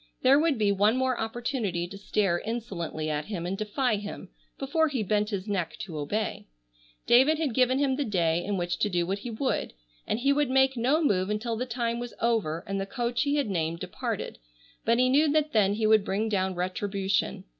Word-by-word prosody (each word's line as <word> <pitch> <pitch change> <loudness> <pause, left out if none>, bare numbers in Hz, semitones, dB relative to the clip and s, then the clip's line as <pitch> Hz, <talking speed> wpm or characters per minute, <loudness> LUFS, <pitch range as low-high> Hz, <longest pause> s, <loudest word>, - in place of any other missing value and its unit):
There 270 +2 +6
would 315 -4 +2
be 210 -2 +2
one 205 +4 +3
more 260 -1 0
opportunity 225 -6 -2
to 195 - -10
stare 195 -3 0
insolently 195 -9 -4
at 150 -1 -2
him 180 -5 -4
and 185 +2 -2
defy 215 +3 0
him, 205 -2 -7 0.3
before 315 +4 +1
he 265 -7 -2
bent 210 +1 +1
his 200 -2 -4
neck 195 -5 -2
to 170 -5 -7
obey. 210 +10 -3 0.6
David 265 +6 +5
had 300 -6 -1
given 255 +1 +3
him 275 -2 +1
the 290 - 0
day 175 -7 +1
in 205 -1 -2
which 175 -1 -2
to 210 - +1
do 175 -2 0
what 195 +3 -2
he 240 - -6
would, 245 +4 -2 0.3
and - - 0
he 275 +4 +2
would 290 -2 +1
make 265 0 +3
no 265 +7 +2
move 190 -8 +1
until 220 +2 -2
the 250 +3 -3
time 235 -1 -2
was 240 -1 -6
over 200 -9 0
and 195 0 -2
the 195 - -4
coach 240 +1 -1
he 290 0 +1
had 285 -4 +1
named 165 -2 -1
departed, - - -4 0.5
but 230 +1 +3
he 255 +1 +4
knew 290 +4 +4
that 305 0 +1
then 205 -2 +3
he 220 0 0
would 215 -1 +5
bring 205 +3 -1
down 190 -2 0
retribution. 190 +2 -1
215 Hz, 210 wpm, -27 LUFS, 190-255 Hz, 0.6 s, There